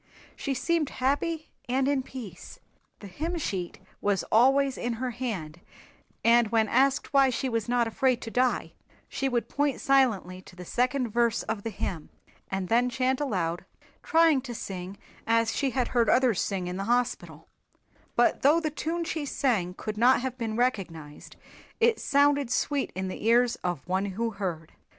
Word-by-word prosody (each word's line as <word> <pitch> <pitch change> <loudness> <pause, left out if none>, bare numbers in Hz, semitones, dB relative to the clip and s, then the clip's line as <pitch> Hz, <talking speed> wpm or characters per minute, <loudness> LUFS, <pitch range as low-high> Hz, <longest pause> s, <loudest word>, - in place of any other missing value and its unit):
She 275 -2 -3
seemed 330 0 0
happy 300 +5 -1 0.2
and 260 +2 +1
in 280 -1 +2
peace. 240 -9 -9 0.4
The - - -9
hymn 320 - -4
sheet 190 - -3 0.2
was 200 -2 +1
always 270 +4 +4
in 240 0 -2
her 250 +2 -3
hand 190 -10 -5 0.6
and 235 0 +5
when 220 0 +2
asked 270 +5 +2
why 275 -1 +5
she 255 +2 -2
was 230 -2 -2
not 245 -1 +2
afraid 250 +2 +1
to 225 - -6
die 250 +1 0 0.3
she 270 - -2
would 240 -2 -1
point 285 -2 0
silently 220 -10 +2
to 185 - -16
the 180 0 -9
second 250 +4 0
verse 235 0 +1
of 220 -2 -3
the 225 - -4
hymn 180 -6 -5 0.4
and 190 -1 -2
then 240 +4 +3
chant 260 +2 0
aloud, 180 - -1 0.4
trying 325 -4 +4
to 245 -2 -7
sing 190 -1 -6 0.3
as 230 0 +2
she 275 - +1
had 250 0 -1
heard 235 -3 +2
others 250 -5 +3
sing 190 -3 -2
in 180 +1 -4
the 195 - -3
Hospital, 245 +2 -1 0.7
but - - +3
though 295 +5 +5
the 310 -2 -2
tune 330 +3 -2
she 320 -2 -3
sang 225 -11 0
could 215 0 -5
not 250 +2 +5
have 260 -1 -3
been 225 -3 -3
recognized 175 -12 -3 0.4
it 465 0 +3
sounded 285 -2 +2
sweet 280 +3 0
in 190 0 -3
the 185 - -6
ears 240 +1 +4
of 175 -6 -4
One 190 +2 0
who 225 +4 -2
heard. 180 -6 -5
240 Hz, 175 wpm, -27 LUFS, 200-270 Hz, 0.7 s, and